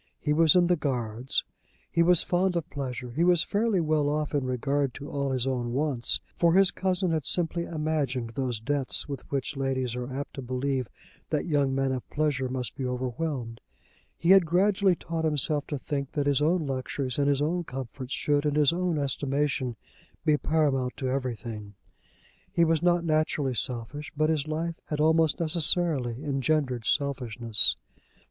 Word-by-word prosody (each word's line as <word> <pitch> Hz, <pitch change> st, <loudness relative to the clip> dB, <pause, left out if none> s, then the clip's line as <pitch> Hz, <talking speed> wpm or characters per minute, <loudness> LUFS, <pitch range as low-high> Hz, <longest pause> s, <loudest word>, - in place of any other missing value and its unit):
He 150 Hz, -, 0 dB
was 160 Hz, 0 st, +5 dB
in 180 Hz, -1 st, +5 dB
the 180 Hz, +1 st, +3 dB
Guards. 125 Hz, -5 st, -2 dB, 0.5 s
He 170 Hz, -, +2 dB
was 175 Hz, 0 st, +5 dB
fond 180 Hz, +1 st, +1 dB
of 170 Hz, -3 st, -2 dB
pleasure. 125 Hz, -3 st, -5 dB
He 155 Hz, +8 st, 0 dB
was 175 Hz, -2 st, +4 dB
fairly 210 Hz, -1 st, +1 dB
well 155 Hz, -3 st, +1 dB
off 150 Hz, 0 st, -2 dB
in 145 Hz, -2 st, +1 dB
regard 135 Hz, +1 st, -1 dB
to 145 Hz, -, -8 dB
all 140 Hz, -1 st, -1 dB
his 130 Hz, -2 st, 0 dB
own 125 Hz, -3 st, -2 dB
wants, 135 Hz, -4 st, 0 dB
for 170 Hz, 0 st, +3 dB
his 195 Hz, 0 st, +5 dB
cousin 185 Hz, -1 st, 0 dB
had 160 Hz, -2 st, 0 dB
simply 170 Hz, +3 st, 0 dB
imagined 150 Hz, -7 st, -2 dB
those 125 Hz, -3 st, -2 dB
debts 135 Hz, +3 st, 0 dB
with 140 Hz, -3 st, -5 dB
which 140 Hz, +1 st, -2 dB
ladies 130 Hz, -3 st, -1 dB
are 125 Hz, +1 st, -5 dB
apt 140 Hz, +2 st, -5 dB
to 135 Hz, -, -6 dB
believe 130 Hz, 0 st, -2 dB, 0.4 s
that -, -, -1 dB
young 145 Hz, -4 st, +1 dB
men 135 Hz, 0 st, +1 dB
of 130 Hz, -2 st, -4 dB
pleasure 145 Hz, -4 st, 0 dB
must 125 Hz, -3 st, -4 dB
be 135 Hz, -, -5 dB
overwhelmed. 125 Hz, -1 st, -3 dB, 0.6 s
He 170 Hz, -, +2 dB
had 195 Hz, -1 st, +8 dB
gradually 190 Hz, +2 st, +3 dB
taught 165 Hz, -1 st, -4 dB
himself 150 Hz, -1 st, 0 dB
to 145 Hz, -, -3 dB
think 140 Hz, +1 st, -4 dB
that 145 Hz, -2 st, 0 dB
his 140 Hz, -1 st, +2 dB
own 160 Hz, +2 st, +2 dB
luxuries 130 Hz, -1 st, -3 dB
and 140 Hz, -, +2 dB
his 140 Hz, -1 st, +2 dB
own 170 Hz, +4 st, 0 dB
comforts 130 Hz, -2 st, -7 dB
should 145 Hz, -2 st, +1 dB
in 150 Hz, -1 st, 0 dB
his 150 Hz, 0 st, +4 dB
own 175 Hz, -2 st, 0 dB
estimation 140 Hz, -2 st, -1 dB, 0.5 s
be 155 Hz, -2 st, +4 dB
paramount 145 Hz, -5 st, 0 dB
to 130 Hz, -, -2 dB
everything. 115 Hz, -5 st, -4 dB, 0.8 s
He 170 Hz, -, +3 dB
was 160 Hz, -1 st, +2 dB
not 175 Hz, -1 st, +2 dB
naturally 155 Hz, -4 st, +1 dB
selfish, 125 Hz, +6 st, -3 dB
but 155 Hz, +1 st, +2 dB
his 155 Hz, -2 st, -1 dB
life 165 Hz, +2 st, -3 dB
had 150 Hz, -, -3 dB
almost 160 Hz, 0 st, +3 dB
necessarily 155 Hz, -6 st, +2 dB
engendered 135 Hz, -5 st, 0 dB
selfishness. 120 Hz, -3 st, +2 dB
145 Hz, 175 wpm, -27 LUFS, 130-160 Hz, 0.8 s, had